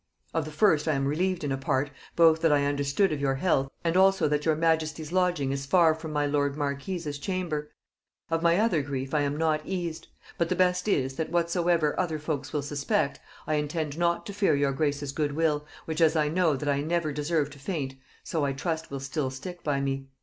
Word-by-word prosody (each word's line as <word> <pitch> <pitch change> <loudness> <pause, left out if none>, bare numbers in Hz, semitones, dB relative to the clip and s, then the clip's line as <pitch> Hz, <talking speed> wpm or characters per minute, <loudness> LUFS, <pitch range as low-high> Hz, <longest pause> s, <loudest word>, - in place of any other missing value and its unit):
Of 160 -1 0
the 155 - -7
first 155 -2 +3
I 155 - +3
am 135 0 0
relieved 175 +4 0
in 145 - -1
a 135 - -1
part, 135 +1 0 0.2
both 160 -1 +5
that 165 - +4
I 145 -1 +3
understood 145 +6 +1
of 145 - -3
your 135 -1 +1
health, 135 -3 +1
and 165 0 0
also 190 -2 +4
that 150 0 0
your 160 - +4
majesty's 160 -1 0
lodging 180 -7 +1
is 135 0 -3
far 165 +1 +5
from 160 0 -7
my 150 -1 +1
lord 145 0 0
marques' 145 +1 -3
chamber: 165 -4 -3 0.6
of 165 0 +1
my 170 0 +4
other 210 -7 +2
grief 135 -1 -4
I 150 - +3
am 145 0 -1
not 155 -1 +1
eased; 175 -2 -4 0.3
but 170 -1 +1
the 185 - +1
best 180 +1 +2
is, 135 -8 0
that 160 - -2
whatsoever 170 -2 +2
other 170 -4 0
folks 150 -2 -4
will 150 -2 -1
suspect, 145 0 -1 0.3
I 155 - -1
intend 150 0 -2
not 170 +1 0
to 205 - -6
fear 195 -6 +2
your 140 -1 +2
grace's 145 -1 -1
good 145 0 -1
will, 150 -1 0 0.2
which 160 +1 -3
as 160 0 +5
I 150 -1 +2
know 165 -2 +2
that 145 +2 -5
I 140 0 +1
never 160 0 0
deserved 150 -1 -1
to 145 - -14
faint, 135 -3 -3 0.3
so 160 -3 -2
I 140 -1 0
trust 160 +3 -3
will 140 - -4
still 135 +1 -2
stick 175 +7 -8
by 140 -2 0
me. 135 0 -2
155 Hz, 220 wpm, -27 LUFS, 140-170 Hz, 0.6 s, both